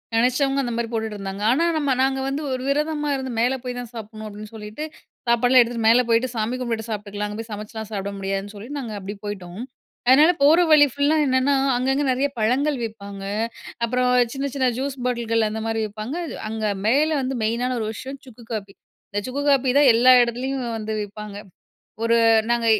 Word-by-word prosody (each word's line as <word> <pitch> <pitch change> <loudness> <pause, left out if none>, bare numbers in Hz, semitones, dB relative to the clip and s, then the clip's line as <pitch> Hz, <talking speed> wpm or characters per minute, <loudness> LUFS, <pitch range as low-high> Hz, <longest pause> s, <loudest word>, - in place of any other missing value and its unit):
நினைச்சவங்க 270 +4 +2
அந்தமாரி 235 -1 -2
போட்டுட்டு 220 -2 -3
இருந்தாங்க. 195 +1 -5
ஆனா, 325 +6 +2
நம்ம 285 -3 0
நாங்க 265 0 +1
வந்து 275 +3 -2
ஒரு 255 0 -2
விரதமா 295 +1 0
இருந்து, 265 -2 -3
மேல 245 +3 +2
போய் 250 -1 -4
தான் 245 -2 -7
சாப்புட்ணும் 220 -1 -8
அப்பிடின்னு 210 +1 -9
சொல்லிட்டு 215 +7 -7 0.4
சாப்பாடுலாம் 245 +2 +5
எடுத்துட்டு 230 -1 -1
மேல 235 +2 +6
போயிட்டு, 230 +2 +3
சாமி 225 +3 -1
கும்பிட்டுட்டு 230 -2 -3
சாப்பிட்டுக்கலாம். 210 -1 -4
அங்க 210 - -6
போய் 225 0 -7
சமச்சுலாம் 215 +1 -6
சாப்பிட 200 -1 -3
முடியாதுன்னு 195 +1 -3
சொல்லி, 205 +4 -9
நாங்க 235 -6 -5
அப்பிடியே 200 +1 -7
போயிட்டோம். 190 0 -6 0.5
அதனால, 295 +7 +7
போற 315 +4 +6
வழி 290 -1 +8
ஃபுல்லா 285 +2 +2
என்னன்னா, 260 +1 +2 0.2
அங்க 255 +2 0
அங்க 285 +1 0
நிறைய 270 +3 +1
பழங்கள் 265 +6 +1
விப்பாங்க. 200 -3 -8 0.6
அப்புறம் 250 +1 +1 0.2
சின்ன, 275 +1 -2
சின்ன 260 -2 +2
ஜூஸ் 275 0 -3
பாட்டில்கள் 230 -3 +1
அந்தமாரி 220 +1 -2
விப்பாங்க. 215 +8 -6 0.3
அங்க 220 -1 -3 0.2
மேல 290 +7 +3
வந்து 260 0 -2
மெயினான 245 +3 0
ஒரு 215 - -2
விஷயம் 265 +4 -8
சுக்கு 235 -1 -14
காப்பி. 200 -2 -5 0.4
இந்த 205 0 -1
சுக்கு 280 +3 -3
காப்பி 265 -2 +3
தான் 280 -3 +6
எல்லா 250 +2 +6
இடத்துலயும் 250 +2 -1
வந்து 215 0 -4
விப்பாங்க. 210 0 -8 0.7
ஒரு 230 0 +3 0.3
நாங்க 235 -1 +1
235 Hz, 180 wpm, -23 LUFS, 215-265 Hz, 0.7 s, வழி